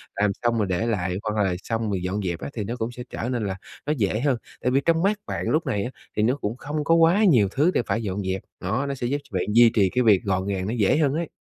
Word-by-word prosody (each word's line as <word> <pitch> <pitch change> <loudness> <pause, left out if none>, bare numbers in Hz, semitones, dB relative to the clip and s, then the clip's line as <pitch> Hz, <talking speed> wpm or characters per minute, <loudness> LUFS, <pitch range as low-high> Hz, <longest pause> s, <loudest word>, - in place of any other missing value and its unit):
làm 105 0 +2
xong 120 -1 +2
rồi 105 -3 +1
để 95 +5 0
lại, 95 -5 -1
hoặc 105 -1 0
là 95 -2 0
xong 115 -1 -2
rồi 95 -2 -1
dọn 95 +3 -2
dẹp 85 -2 -2
á - - -5
thì 110 - -3
nó 115 +4 -4
cũng 115 0 -3
sẽ 125 0 -8
trở 120 - -4
nên 120 -4 -1
là 95 -1 -2 0.3
nó 150 - +1
dễ 105 -1 0
hơn. 135 -1 +1 0.2
Tại 125 - +1
vì 135 +2 +3
trong 165 0 +3
mắt 205 +1 +2
bạn - - -3
lúc 160 +2 +1
này - - -1
á 120 - -3 0.3
thì 105 - +3
nó 125 +4 +3
cũng 115 -4 -4
không 150 +3 -3
có 165 +3 +4
quá 170 +6 +5
nhiều 125 - +5
thứ 155 +6 +3
để - - +2
phải 115 - -1
dọn 100 -1 -2
dẹp, 95 0 -2 0.2
đó, 110 +10 -1
nó 140 - -2
sẽ 125 -2 -3
giúp 140 +4 0
bạn - - 0
duy 120 +1 +7
trì 100 -4 +4
cái 125 +4 +1
việc 105 -5 +4
gọn 95 -1 -1
gàng 95 -2 -2
nó 110 - -2
dễ 110 +5 +3
hơn 145 -4 +2
ấy. 165 +1 -2
115 Hz, 300 wpm, -24 LUFS, 100-140 Hz, 0.3 s, duy